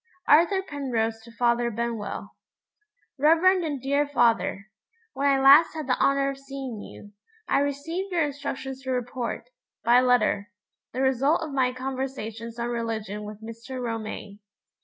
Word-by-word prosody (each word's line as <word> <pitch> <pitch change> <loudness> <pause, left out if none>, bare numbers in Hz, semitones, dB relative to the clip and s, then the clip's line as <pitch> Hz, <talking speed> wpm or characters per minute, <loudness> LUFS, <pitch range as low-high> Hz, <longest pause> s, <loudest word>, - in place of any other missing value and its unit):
Arthur 345 +5 +5
Penrose 235 -8 -2
to 230 +1 -14
Father 235 0 +1
Benwell. 235 -1 -4 0.9
REVEREND 340 +5 +5
AND 290 -5 -3
DEAR 280 +2 +1
FATHER 230 -6 +1 0.4
When 280 - 0
I 275 -1 +3
last 280 +5 +7
had 310 -2 -4
the 255 -1 +2
honor 275 0 +2
of 275 - -9
seeing 270 -4 -6
you, 205 - -12 0.4
I - - +3
received 310 +7 -2
your 340 -3 +2
instructions 270 -2 -4
to 265 - -7
report, 245 -1 -3 0.3
by 240 +2 +6
letter, 245 -5 +2 0.4
the 255 - -3
result 270 +5 +2
of 310 - -5
my 260 -2 +2
conversations 255 -3 -5
on 235 0 -2
religion 220 -3 -3
with 210 +1 -9
Mr. 230 +3 -7
Romayne. 220 -3 -5
255 Hz, 145 wpm, -26 LUFS, 230-280 Hz, 0.9 s, last